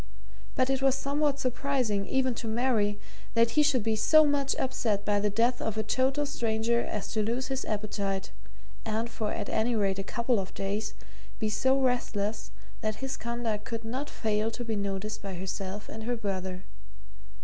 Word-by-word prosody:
But 255 +1 +3
it 270 0 +1
was 270 -1 +4
somewhat 280 +1 +1
surprising, 250 -6 0
even 260 -1 +2
to 230 - -5
Mary, 220 -3 +2 0.4
that 230 0 +5
he 300 - +4
should 285 -6 +3
be 220 0 +2
so 310 +8 +6
much 285 -2 +2
upset 215 -6 0
by 205 -1 +3
the 210 +1 +2
death 235 +4 +2
of 220 -1 -2
a 215 - +1
total 265 +6 +1
stranger 230 -3 +1
as 205 0 -4
to 220 - +1
lose 235 +5 -1
his 265 0 -1
appetite, 205 -2 -2 0.5
and, 225 +2 -1
for 215 -2 -2
at 205 - -3
any 230 +2 +1
rate 195 -2 +1
a - - -1
couple 235 +2 +1
of 190 - -5
days, 210 +2 -2 0.4
be 215 - 0
so 260 +5 +3
restless 225 -5 0 0.3
that 215 -1 -1
his 270 +3 -3
conduct 235 -3 -2
could 230 +1 -4
not 260 +6 -3
fail 215 0 0
to 240 +1 -5
be 225 -1 -1
noticed 200 +1 -2
by 195 -2 -5
herself 190 +2 -4
and 220 0 -7
her 245 +1 0
brother. 190 -4 -3
225 Hz, 180 wpm, -29 LUFS, 205-255 Hz, 0.5 s, so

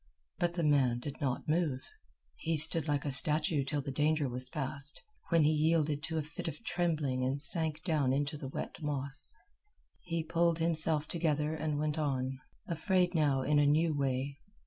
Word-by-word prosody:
But 175 0 0
the 170 - -1
man 135 -5 +3
did 140 +5 -7
not 130 -3 -2
move. 155 -5 0 0.5
He 165 - -2
stood 160 0 +4
like 145 -1 0
a 145 - -1
statue 150 +1 +4
till 145 +1 -2
the 140 - -4
danger 150 +1 +1
was 125 +1 +4
past, 140 -1 -2 0.3
when 165 -2 +4
he 150 - +4
yielded 155 -1 +1
to 160 +3 -3
a 155 - 0
fit 155 +2 -7
of 165 - -6
trembling 155 - -1
and 135 +2 -1
sank 155 +1 -3
down 150 -7 +1
into 145 +3 -1
the 140 -2 -6
wet 135 - -6
moss. 140 +1 -4 0.6
He 170 -2 -3
pulled 165 +1 +1
himself 160 -2 0
together 155 -2 0
and 155 -2 -2
went 150 +1 -1
on, 135 -3 -2 0.3
afraid 180 +2 +1
now 145 -5 +2
in 150 +2 +3
a 145 - +4
new 155 +2 +2
way. 135 0 -2
150 Hz, 180 wpm, -32 LUFS, 140-160 Hz, 0.6 s, stood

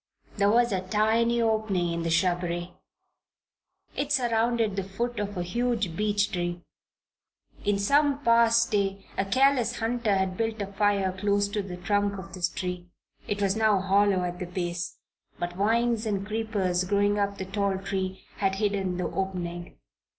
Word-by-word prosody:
There 200 0 +3
was 235 +2 +3
a 190 -2 0
tiny 220 +5 +2
opening 215 -6 0
in 170 - -2
the 165 - -1
shrubbery. 175 +1 0 1.2
It 285 0 -2
surrounded 235 -4 +1
the 195 - -1
foot 235 +5 -3
of 205 -1 -3
a 175 - -1
huge 220 -2 -1
beech 205 0 +1
tree. 175 -2 -3 1.0
In 205 -1 +2
some 280 +7 +2
past 230 -1 +4
day 195 -1 0
a - - +1
careless 250 +1 +2
hunter 230 -2 0
had 190 -1 -1
built 225 -1 -1
a 200 - -1
fire 200 -1 +2
close 200 +2 +1
to 205 0 -1
the 185 -2 -7
trunk 205 +2 0
of 190 -3 -9
this 180 -2 -1
tree. 180 0 -5 0.4
It 205 0 -1
was 195 0 +2
now 215 -3 +3
hollow 195 0 +3
at 175 0 -4
the 180 - -4
base, 175 -1 -4 0.4
but 175 0 -3
vines 225 +3 +1
and 200 -2 -1
creepers 205 -4 -1
growing 205 +2 +1
up 200 0 -1
the 190 - -4
tall 200 0 -1
tree 190 -1 -4
had 195 -1 +1
hidden 195 -3 -1
the 180 - -2
opening. 175 -2 -4
200 Hz, 165 wpm, -27 LUFS, 185-220 Hz, 1.2 s, past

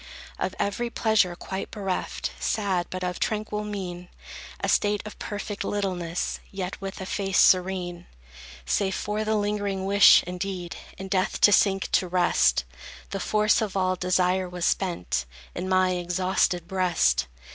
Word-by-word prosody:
Of - - -2
every 235 +4 -1
pleasure 220 -6 +2
quite 190 +2 -5
bereft, 195 -4 -3
Sad 195 -5 0
but 185 0 -5
of 180 0 -3
tranquil 210 -1 -2
mien; 180 -4 -6 0.5
A - - -2
state 205 -1 +2
of 215 - -9
perfect 205 -1 -5
littleness, 180 -4 -2
Yet 195 -1 -5
with 195 0 -6
a - - -4
face 195 0 -1
serene; 180 -2 +3 0.6
Save 190 - 0
for 210 +1 -2
the 215 0 0
lingering 205 -2 -1
wish, 200 +1 +7
indeed, 180 -1 -5 0.2
In 190 - -6
death 185 -1 0
to 205 - +7
sink 195 -1 +3
to 185 - +2
rest, 170 - +2 0.5
The 195 - -3
force 210 +3 +2
of 205 -3 -2
all 185 -1 +1
desire 185 0 +1
was 180 -1 -3
spent 90 - 0 0.3
In 185 - -4
my 185 0 +3
exhausted 180 -1 0
breast. 175 - +2
190 Hz, 145 wpm, -26 LUFS, 180-205 Hz, 0.6 s, wish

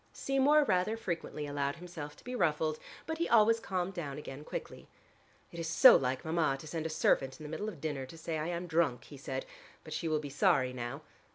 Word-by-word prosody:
Seymour 275 +3 +3
rather 210 -1 +1
frequently 170 -7 -4
allowed 145 -1 -2
himself 165 -4 -8
to - - -19
be 250 - -6
ruffled, 155 -7 +1 0.3
but 320 0 -4
he 340 - 0
always 230 0 +5
calmed 190 -3 -2
down 150 -6 -5
again 145 -1 -8
quickly. - - -7 0.6
"It 170 - -8
is 165 - -3
so 240 +10 +9
like 130 0 0
Mama 160 -4 +1
to 155 - -10
send 160 +1 -3
a - - -6
servant 135 -4 +1
in - - -9
the 150 - -7
middle 210 +6 -3
of 170 - -10
dinner 140 -3 -3
to 165 - -12
say 160 0 -3
I 155 - -2
am 175 0 -3
drunk," 160 -8 +1
he 145 - -12
said, 145 - -4 0.4
"but - - -8
she 165 - -2
will 155 -1 +2
be 145 -1 -6
sorry 130 -2 +3
now. 125 +4 -5
160 Hz, 220 wpm, -32 LUFS, 145-185 Hz, 0.6 s, so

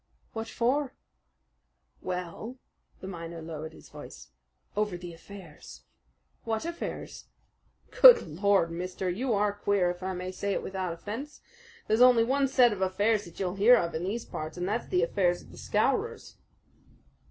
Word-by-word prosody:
"What 225 0 -4
for?" 260 +5 0 1.1
"Well," 180 +7 -5 0.4
the 190 - -7
miner 170 -2 -7
lowered 160 -1 -7
his - - -15
voice - - -11 0.5
"over 210 -3 -1
the 175 -1 -9
affairs." 170 -2 -12 0.6
"What 225 +4 -2
affairs?" 340 0 -6 0.7
"Good - - +9
Lord, 185 +1 +2
mister! 180 +2 -3
you 240 +6 -1
are 205 0 +1
queer, 200 -3 +1
if 180 +1 -10
I 190 0 -3
must 185 +1 -6
say 200 0 0
it - - -2
without 190 -2 -3
offense. 220 - -7 0.5
There's 220 +2 +2
only 250 -2 +7
one 270 +3 +2
set 250 -4 +4
of 195 - -7
affairs 205 +3 +1
that 170 - -13
you'll 185 -2 -1
hear 225 +5 +7
of 170 -5 -1
in 160 - -3
these 215 +5 -3
parts, 155 +2 -6
and 180 +1 -2
that's 220 +4 -2
the 180 -1 +1
affairs 175 0 +1
of - - -17
the - - -14
Scowrers." - - -1
195 Hz, 160 wpm, -28 LUFS, 175-225 Hz, 1.1 s, Good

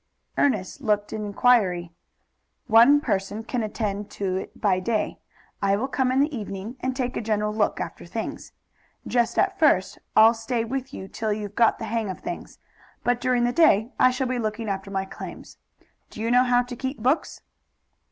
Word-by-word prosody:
Ernest 225 -2 0
looked 210 -4 0
an 215 -1 -3
inquiry. 200 -5 +2 0.7
"One 245 +6 +6
person 200 -1 -2
can 245 +1 -2
attend 210 -2 -3
to 190 -2 -1
it - - -7
by 190 -3 +2
day. 215 +3 -1 0.4
I 200 0 +3
will 235 +6 -1
come 260 -1 0
in 260 - +2
the 290 0 0
evening, 205 +1 -6
and 260 0 -2
take 255 -1 -2
a - - -2
general 210 -1 0
look 215 -1 0
after - - -6
things. - - -5 0.5
Just 240 -2 0
at 385 0 +1
first 235 - +3 0.2
I'll 220 +1 +8
stay 225 +1 -2
with 265 +2 -4
you 190 -8 -7
till 215 +2 -3
you've 205 -1 -4
got 230 +1 +3
the 225 - -5
hang 225 -2 -2
of 185 - -5
things. 345 +1 -7 0.5
But 245 0 +1
during 250 -1 +2
the 240 - +2
day 240 -8 +4
I 255 - +6
shall 255 +1 -1
be 255 -1 -1
looking 220 0 -3
after 195 0 -3
my 195 -1 -2
claims. - - -10 0.5
Do - - -11
you 225 +2 -1
know 250 +1 +5
how 245 0 +3
to 245 0 -8
keep 265 +3 -4
books?" 260 +8 0
225 Hz, 190 wpm, -25 LUFS, 205-250 Hz, 0.7 s, I'll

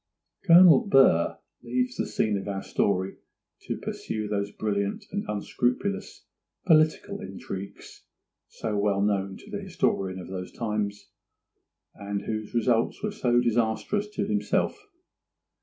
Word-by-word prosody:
Colonel 180 +4 +8
Burr 135 - +4 0.2
leaves 125 +1 -1
the - - -2
scene 110 -2 0
of 100 0 -4
our 95 -1 -3
story 95 -1 0 0.5
to - - -2
pursue 110 -1 -4
those 100 -1 -1
brilliant 100 -1 -2
and 205 +1 -2
unscrupulous 125 - -2 0.4
political 155 -3 +3
intrigues 95 +1 -8 0.5
so 110 -2 -4
well 100 -1 +1
known 100 -2 0
to - - -14
the - - -4
historian 95 -1 -1
of 90 - -8
those 90 -1 -6
times, 105 -3 -3 0.8
and 100 0 -4
whose 110 +1 -4
results 115 - +1
were 210 - -1
so 120 - +2
disastrous 120 - 0
to 200 - 0
himself. 215 - -1
110 Hz, 125 wpm, -27 LUFS, 100-130 Hz, 0.8 s, Colonel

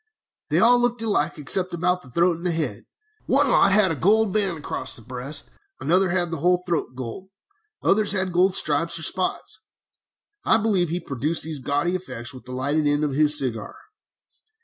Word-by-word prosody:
"They - - +1
all 245 +1 +6
looked 240 -1 0
alike 170 -9 0
except 180 +5 -1
about 180 +1 0
the 130 - -16
throat 170 +5 +1
and 175 +2 -4
head. 155 -11 -3 0.4
One - - +3
lot 195 - +4
had 195 -2 +3
a - - -2
gold 205 +6 +2
band 195 -5 0
across 130 -3 -4
the 115 - -11
breast, 130 +5 -7 0.3
another 185 +5 +2
had 175 -1 0
the 165 - -4
whole 180 +3 +2
throat 165 -7 -2
gold, 130 +9 -7 0.5
others 210 0 +3
had 185 -2 0
gold 185 +2 +3
stripes 160 +3 +2
or 160 - -3
spots. 185 +3 -2 0.8
I - - +4
believe 200 -6 0
he 175 +2 -2
produced 150 +1 -3
these 155 -2 -4
gaudy 145 +6 -1
effects 130 -9 -6
with 125 -2 -13
the 125 - -10
lighted 145 +4 -1
end 145 +1 +1
of 150 - 0
his 150 +1 +4
cigar. 115 -6 -2
170 Hz, 185 wpm, -23 LUFS, 145-185 Hz, 0.8 s, all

